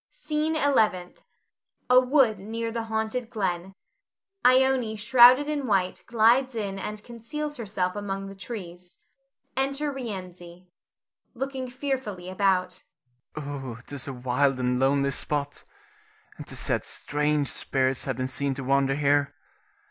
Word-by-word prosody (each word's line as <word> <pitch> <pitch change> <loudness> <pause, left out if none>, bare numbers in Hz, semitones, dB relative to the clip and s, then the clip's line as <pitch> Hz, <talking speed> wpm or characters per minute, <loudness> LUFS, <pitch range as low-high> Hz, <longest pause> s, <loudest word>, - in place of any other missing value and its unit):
SCENE 305 +1 -2
ELEVENTH. 220 - +1 0.7
[A 250 0 +7
wood 255 -5 +3
near 225 +3 -4
the 230 0 -3
haunted 220 +2 -2
glen. 190 -4 -3 0.7
Ione 255 -3 +4
shrouded 245 +5 +6
in 290 -3 -2
white 190 -4 +1
glides 240 +3 +3
in 200 -3 -3
and 210 +2 -5
conceals 295 +6 -6
herself 195 -5 -2
among 195 -1 -4
the 195 - -8
trees. 180 -4 -8 0.6
Enter 275 +2 0
Rienzi.] 185 -8 -7
Rienzi - - -39 0.7
[looking 265 0 -4
fearfully 245 -9 -4
about]. 185 -1 +1 0.5
'Tis 140 -2 -6
a 140 - -4
wild 130 +2 +1
and 125 0 0
lonely 140 +1 +2
spot, 145 +1 -3 0.7
and - - -10
'tis - - -7
said - - 0
strange 150 0 -1
spirits 130 -1 0
have 130 -3 -2
been 130 - -1
seen 135 +1 -1
to 135 - -6
wander 135 +1 +2
here. 145 0 +1
195 Hz, 130 wpm, -26 LUFS, -, 0.7 s, A